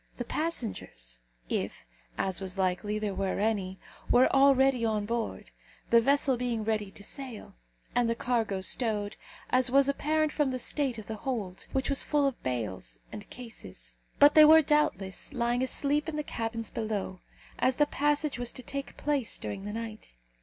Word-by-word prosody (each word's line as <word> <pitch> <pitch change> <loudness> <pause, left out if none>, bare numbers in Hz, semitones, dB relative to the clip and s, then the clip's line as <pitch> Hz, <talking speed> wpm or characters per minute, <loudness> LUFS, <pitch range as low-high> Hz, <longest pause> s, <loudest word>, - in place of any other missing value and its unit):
The 245 - -4
passengers, 215 - -3 0.3
if, - - -3 0.3
as 190 -1 -1
was 190 0 -5
likely, 190 +3 0
there 210 -2 -2
were 195 0 -1
any, 200 -3 0 0.3
were 250 +1 +6
already 270 -2 +5
on 215 -2 0
board, 230 +1 -3 0.4
the 235 0 +7
vessel 275 0 +3
being 235 -2 -1
ready 215 -2 -1
to 200 - -12
sail, 255 0 -7 0.4
and 240 -1 +2
the 230 - +1
cargo 225 -6 -1
stowed, 210 0 -1 0.4
as 255 0 +4
was 275 +1 +4
apparent 305 +2 +1
from 295 -3 +1
the 255 - -2
state 260 -1 -1
of 220 - -7
the 220 0 -5
hold, 205 -7 -4
which 265 0 0
was 275 - +2
full 295 -2 +1
of 275 -3 -1
bales 105 - -3
and 105 - -9
cases. 90 - -10 0.2
But 290 +1 +7
they 310 - +9
were, 315 +1 +8
doubtless, 275 -8 0
lying 240 -1 0
asleep 290 +4 +1
in 315 - -5
the 300 - -2
cabins 225 -3 -4
below, 210 -4 -3 0.4
as 255 - +3
the 295 - +4
passage 295 -1 0
was 245 -1 0
to 255 - -4
take 275 +3 -5
place 280 -6 0
during 195 -1 -6
the 205 - -4
night. 225 - -7
235 Hz, 175 wpm, -29 LUFS, 205-275 Hz, 0.4 s, they